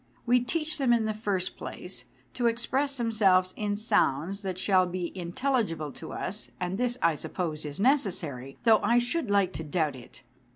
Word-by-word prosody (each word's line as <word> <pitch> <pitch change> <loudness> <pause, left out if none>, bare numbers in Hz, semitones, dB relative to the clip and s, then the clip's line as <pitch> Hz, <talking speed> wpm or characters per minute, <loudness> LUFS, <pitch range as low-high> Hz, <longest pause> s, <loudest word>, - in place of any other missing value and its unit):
We 250 +1 +5
teach 305 +5 -1
them 255 -3 +4
in 230 -2 +2
the 215 - 0
first 205 -4 -2
place - - -6 0.3
to 245 -2 +1
express 265 +4 0
themselves 195 -6 +3
in 205 -1 -1
sounds 195 -3 +1
that 190 -3 -4
shall 185 -1 +3
be 180 0 -4
intelligible 175 - -1
to - - -9
us, 205 +3 -3
and 180 +2 -2
this, 245 0 +1
I 165 - +5
suppose, 155 0 -4
is 145 +2 -6
necessary, 180 - 0
though 225 -2 +6
I 235 +3 +3
should 245 +2 +1
like 200 -2 +2
to 160 - -4
doubt 155 -2 0
it. 125 -2 -13
200 Hz, 175 wpm, -28 LUFS, 175-240 Hz, 0.3 s, though